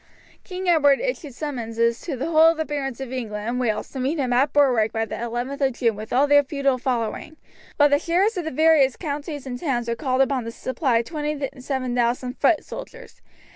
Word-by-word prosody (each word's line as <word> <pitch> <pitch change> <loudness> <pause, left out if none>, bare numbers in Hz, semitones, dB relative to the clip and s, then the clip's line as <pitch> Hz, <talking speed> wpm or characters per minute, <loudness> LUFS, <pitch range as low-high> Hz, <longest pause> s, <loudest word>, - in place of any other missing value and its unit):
King 370 -1 -6
Edward 290 -5 +4
issued 355 - -4
summonses 235 -5 -1
to 295 -7 -4
the 255 - -3
whole 320 0 +6
of 330 - 0
the 315 - -1
barons 270 -4 -4
of 265 -1 -6
England 215 -4 -4
and 245 +1 -1
Wales 220 -4 -1
to 270 - -6
meet 270 +6 -1
him 255 -4 0
at 265 +4 +3
Berwick 250 -7 +3
by 225 0 -1
the - - -9
11th 240 +4 -4
of 265 -2 +2
June 230 -2 0
with 215 +1 -8
all 265 +3 +4
their 290 0 +6
feudal 275 -2 0
following, 250 +4 -3 0.4
while 290 - +6
the 285 0 +3
sheriffs 365 +7 +1
of 355 -3 -3
the - - -1
various 310 -3 +4
counties 290 -2 -5
and 245 -2 -5
towns 245 -6 -1
were 235 - 0
called 260 -1 0
upon 265 -2 +1
to 230 - -5
supply 245 -1 0
27,000 260 -4 -2
foot 300 +3 +2
soldiers. - - -10
270 Hz, 205 wpm, -23 LUFS, 245-300 Hz, 0.4 s, whole